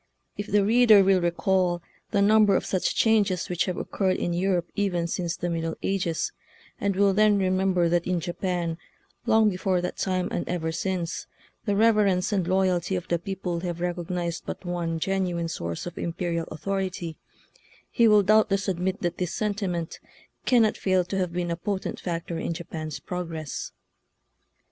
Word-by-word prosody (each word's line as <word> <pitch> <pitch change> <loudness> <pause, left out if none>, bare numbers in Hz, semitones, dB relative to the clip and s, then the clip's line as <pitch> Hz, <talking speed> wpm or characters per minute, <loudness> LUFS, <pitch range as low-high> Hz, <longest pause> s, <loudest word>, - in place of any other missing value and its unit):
If 205 - -5
the 205 -1 +3
reader 220 -2 +6
will 190 -1 +4
recall 175 0 +1 0.3
the 200 -2 +2
number 210 -1 +5
of - - 0
such 185 - 0
changes 205 -5 +2
which 180 0 0
have 180 -2 -3
occurred 190 -2 0
in 175 - -1
Europe 180 -1 0
even 185 -4 0
since 170 0 -2
the 175 - -3
Middle 165 -1 -2
Ages, 185 -4 -1 0.5
and 200 -1 0
will 200 0 +4
then 210 0 +4
remember 185 -2 +2
that 170 0 +1
in 180 -1 +1
Japan, 175 -1 -2 0.5
long 220 -1 +5
before 185 -1 +1
that 180 - -4
time 185 -1 0
and - - -3
ever 165 -2 -1
since, 175 0 -3 0.4
the 205 -3 +1
reverence 210 -4 +3
and 190 -4 0
loyalty 185 0 +1
of 180 - -4
the 170 - +1
people 180 -1 -3
have 175 -1 -4
recognized 175 -1 -3
but - - -6
one 170 -2 -2
gen 195 +2 0
uine 170 -1 -2
source 85 - -4
of 175 - -7
imperial 170 -1 -2
authority, 185 0 -3 0.8
he 235 - +4
will 210 -1 +6
doubtless 205 -1 +3
admit 190 +3 -1
that 175 0 -2
this 180 -3 -2
sentiment 195 -6 -2 0.5
can 245 -3 +5
not 215 - +1
fail 185 -2 +2
to 195 - -3
have 180 -2 -1
been 175 0 -2
a - - 0
potent 190 +3 -3
factor 170 -1 -4
in 170 - -2
Japan's 160 -2 -6
progress. 165 -5 -5
180 Hz, 170 wpm, -26 LUFS, 170-195 Hz, 0.8 s, reader